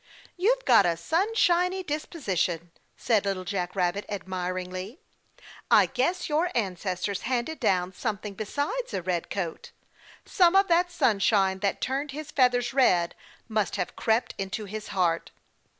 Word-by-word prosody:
"You've - - +1
got 195 - +6
a 170 -1 0
sunshiny 360 - +1
disposition," 195 - -2 0.3
said 225 -5 +2
Little 195 -2 -2
Jack 180 -1 -3
Rabbit 185 +2 0
admiringly. 185 - -4 0.7
"I - - +7
guess 265 +8 -1
your 320 +4 +1
ancestors 195 -2 -2
handed 255 +5 -2
down 185 -5 +1
something 210 0 -4
besides 285 - -3
a 180 - -3
red 175 -2 -2
coat 175 -5 -4 0.6
some 360 -1 +4
of 390 0 +5
that 350 +1 +3
sunshine 195 - +2
that 200 0 -1
turned 275 +2 -2
his 305 0 -7
feathers 245 -2 +2
red 180 -11 +3 0.3
must 215 -3 -1
have 180 -3 -3
crept 225 +2 +1
into 195 +2 -3
his 210 +2 -6
heart." 175 -3 0
215 Hz, 135 wpm, -27 LUFS, 185-300 Hz, 0.7 s, I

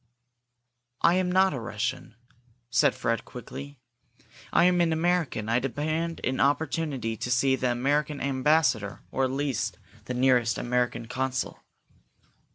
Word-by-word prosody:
"I 170 - +6
am 180 0 +1
not 190 +1 +4
a 135 - -3
Russian," 120 +2 -4 0.6
said 140 +1 +3
Fred, 115 0 -1
quickly. 135 +3 -9 0.7
"I - - +4
am 180 0 +4
an 170 -1 +2
American. 160 -9 0
I 115 +2 +2
demand 155 +6 -2
an 130 +1 -1
opportunity 140 -4 0
to 115 - -5
see 130 +2 +3
the 130 -1 0
American 145 +4 0
ambassador, 135 -5 +1
or 135 - +1
at - - -1
least 135 -2 -2 0.3
the 125 - -4
nearest 125 -2 +3
American 120 -1 -1
consul." 130 +1 -2
135 Hz, 135 wpm, -27 LUFS, 125-155 Hz, 0.7 s, I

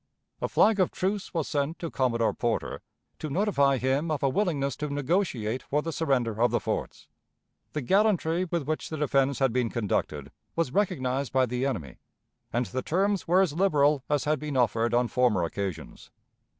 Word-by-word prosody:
A - - 0
flag 215 -2 +4
of 185 - +3
truce 195 +2 -2
was 165 -4 -2
sent 145 +3 -1
to 165 - -5
Commodore 115 -4 +1
Porter 120 -2 -2 0.4
to 155 - -4
notify 140 -6 +2
him 135 +6 0
of 150 -3 -2
a 135 - +4
willingness 140 - 0
to 150 - -3
negotiate 140 - -1
for 150 +2 -1
the 165 - -3
surrender 125 -9 0
of 120 - +5
the - - +1
forts. - - -4 0.7
The 150 - -2
gallantry 185 - +2
with 170 -3 -2
which 155 +3 -3
the 155 - -4
defense 140 -2 +1
had 135 -4 +1
been 125 -2 +1
conducted 110 -4 -2 0.2
was 165 -6 -1
recognized 140 - 0
by 130 -1 +3
the 125 +2 -1
enemy, 80 - -5 0.5
and 120 +2 0
the 130 +3 -3
terms 195 +6 0
were 180 +3 +5
as 180 -6 +1
liberal 150 -6 +3
as 145 -2 +1
had 150 0 0
been 150 -3 -3
offered 115 -1 +2
on 120 0 +3
former 120 -8 +2
occasions. 85 -2 -5
140 Hz, 180 wpm, -27 LUFS, 125-165 Hz, 0.7 s, of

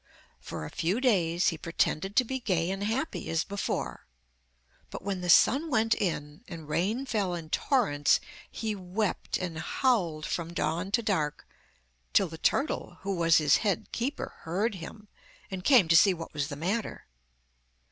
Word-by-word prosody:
For 75 - -6
a - - -8
few 180 +8 0
days 180 -9 +2
he 165 - -5
pretended 170 +3 -1
to 255 - +5
be 265 +2 -3
gay 185 -7 0
and 195 +1 -3
happy 230 +9 -2
as 165 -1 +1
before, 200 0 -4 0.8
but - - -8
when 195 -2 -3
the 180 - -3
sun 285 - +5
went 225 -4 +3
in, 150 -1 -3
and 165 -4 -9
rain 205 - 0
fell 205 -8 -1
in 160 -2 -8
torrents, 195 - +2 0.3
he 220 -1 -3
wept 190 +2 -2
and 170 -3 -4
howled 170 - 0
from 170 0 -3
dawn 170 +3 -1
to 235 - +2
dark, 165 -9 -1 0.7
till 195 - +4
the 160 0 -9
turtle, 270 - 0
who 195 0 -2
was 165 -2 +4
his 150 -3 +4
head 200 -6 -1
keeper, 260 +5 -3
heard 195 +8 -1
him, 195 +4 -9 0.4
and 185 -1 -5
came 240 - +6
to 165 - +6
see 190 +3 +6
what 165 -1 -8
was 145 -2 -1
the 145 - -6
matter. 195 +9 -3
185 Hz, 165 wpm, -29 LUFS, 165-220 Hz, 0.8 s, came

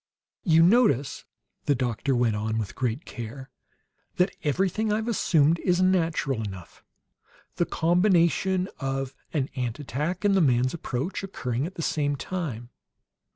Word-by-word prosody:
"You 165 -6 +5
notice," 175 - +3 0.4
the 145 - +3
doctor 125 +1 -1
went 120 -3 +2
on, 110 +1 -2
with 105 -4 -3
great 125 +2 -2
care, 125 +3 -8 0.6
"that 180 +1 +1
everything 190 +8 0
I've 220 +2 0
assumed 165 -8 +3
is 180 -1 +1
natural 165 -9 +1
enough: 95 -5 -8 0.7
the 175 - +1
combination 180 +1 +2
of 135 -1 -2 0.2
an 140 -4 -1
ant 125 -2 -2
attack 150 - -3
and 200 - +4
the 195 - +4
man's 130 -3 +3
approach, 150 +1 -3
occurring 135 -8 -3
at 185 - -11
the 165 - -4
same 145 -2 0
time. 140 -9 -5
145 Hz, 140 wpm, -26 LUFS, 125-180 Hz, 0.7 s, You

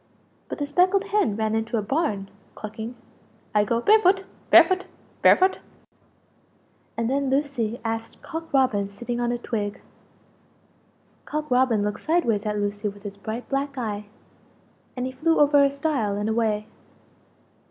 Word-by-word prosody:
But - - -4
the 290 - -2
speckled 365 +6 +3
hen 400 - +2
ran 220 0 -1
into 225 +1 -1
a 215 - -1
barn, 210 -6 -1 0.3
clucking 220 +3 -7 0.6
"I 210 -1 +4
go 230 +3 0
barefoot, 390 - +4 0.3
barefoot, 370 -1 +6 0.3
barefoot!" 375 +1 +5 1.4
And 230 0 0
then 275 +1 0
Lucie 265 -5 -1
asked 225 0 -4
Cock 325 -1 -6
Robin 240 -8 +2
sitting 240 +4 -5
on 240 0 0
a 240 - -1
twig. 210 -4 -3 1.5
Cock 305 -2 -4
Robin 250 -4 +3
looked 210 0 -2
sideways 235 -11 +1
at 210 0 -1
Lucie 205 +1 -2
with 200 0 -13
his 205 -1 -7
bright 220 +4 -6
black 275 0 -2
eye, 210 -4 -3 0.9
and 250 - -1
he 260 - -3
flew 325 +6 +1
over 290 -1 +6
a 280 - +4
stile 280 -8 -1
and 205 +1 -2
away. 220 -2 0
240 Hz, 145 wpm, -24 LUFS, 210-285 Hz, 1.5 s, barefoot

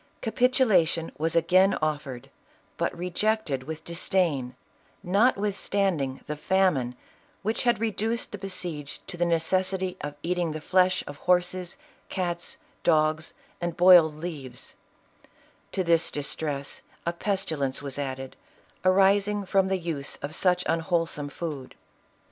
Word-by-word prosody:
Capitulation 220 - +2
was 165 +1 0
again 185 +4 +4
offered, 145 -5 -3 0.4
but - - -2
rejected 180 -4 0
with 160 +1 -6
disdain, 165 -7 0 0.5
notwithstanding 195 - +1
the 150 - -4
famine 150 -7 +1 0.5
which 220 +4 -1
had 240 -3 +3
reduced 225 +1 -1
the 205 - -6
besieged 175 -7 -4
to 195 - -6
the 175 0 +1
neces 180 +3 +1
sity 185 -1 -3
of 145 0 -5
eating 175 -2 0
the 155 - -4
flesh 185 +3 +2
of 145 - -8
horses, 180 +1 0 0.3
cats, 175 -2 -3 0.2
dogs, 155 -1 +2 0.3
and 175 -1 -3
boiled 175 -4 +7
leaves; 150 -6 -8 1.0
to 190 - 0
this 165 -1 +3
distress 145 -1 -3 0.2
a 170 - 0
pestilence 160 -9 -1
was 140 0 -4
added, 135 -1 -4 0.5
arising 195 +2 +3
from 190 0 +2
the 190 0 +1
use 165 -5 -4
of 145 +2 -4
such 180 +1 +2
unwholesome 165 -3 0
food. 145 -4 -6
175 Hz, 125 wpm, -27 LUFS, 150-190 Hz, 1.0 s, boiled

